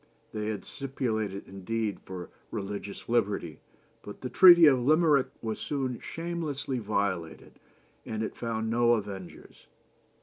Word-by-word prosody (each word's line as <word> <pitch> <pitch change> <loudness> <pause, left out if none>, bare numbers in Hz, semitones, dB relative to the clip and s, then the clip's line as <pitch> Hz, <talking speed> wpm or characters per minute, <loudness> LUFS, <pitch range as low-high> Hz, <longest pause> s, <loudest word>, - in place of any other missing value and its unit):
They 105 -1 -3
had 110 -2 -4
stipulated 110 -8 -3
indeed 105 +2 -3
for 90 -2 -7 0.2
religious 100 -1 -6
liberty, 105 -8 0 0.4
but 105 - -10
the 125 - -5
Treaty 175 -3 +9
of 135 -4 +6
Limerick 150 0 +4 0.2
was 110 -1 -3
soon 130 -4 -2
shamelessly 160 -6 -4
violated, 100 -6 -3 0.4
and 110 0 -3
it - - -4
found 115 -1 -3
no 120 0 +4
avengers. 100 -5 -6
115 Hz, 125 wpm, -29 LUFS, 100-135 Hz, 0.4 s, Treaty